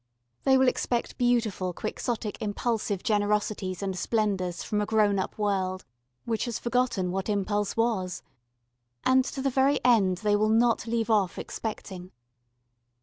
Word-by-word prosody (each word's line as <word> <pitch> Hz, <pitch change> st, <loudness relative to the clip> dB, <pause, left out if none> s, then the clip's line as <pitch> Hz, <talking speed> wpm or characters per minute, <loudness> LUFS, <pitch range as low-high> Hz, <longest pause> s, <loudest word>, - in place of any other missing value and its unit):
They 265 Hz, -1 st, +6 dB
will 260 Hz, 0 st, +4 dB
expect 240 Hz, -1 st, -1 dB
beautiful 225 Hz, -7 st, +1 dB
quixotic 215 Hz, +2 st, -4 dB
impulsive 210 Hz, -2 st, -1 dB
generosities 205 Hz, -3 st, 0 dB
and 190 Hz, -1 st, -2 dB
splendours 190 Hz, -4 st, -1 dB
from 210 Hz, -1 st, -1 dB
a -, -, 0 dB
grown 210 Hz, -3 st, +3 dB
up 190 Hz, -, -4 dB
world 190 Hz, -3 st, -1 dB, 0.4 s
which 225 Hz, 0 st, -1 dB
has 235 Hz, -3 st, -3 dB
forgotten 240 Hz, -7 st, 0 dB
what 195 Hz, +3 st, -3 dB
impulse 205 Hz, 0 st, -1 dB
was: 210 Hz, -6 st, 0 dB, 0.8 s
and 260 Hz, 0 st, +5 dB
to 270 Hz, -, -4 dB
the 275 Hz, -, +1 dB
very 270 Hz, +2 st, +3 dB
end 200 Hz, -7 st, +4 dB
they 210 Hz, +1 st, +1 dB
will 215 Hz, +1 st, +2 dB
not 230 Hz, +1 st, +3 dB
leave 230 Hz, 0 st, 0 dB
off 200 Hz, -4 st, +2 dB
expecting. 190 Hz, -4 st, -6 dB
210 Hz, 145 wpm, -27 LUFS, 195-235 Hz, 0.8 s, They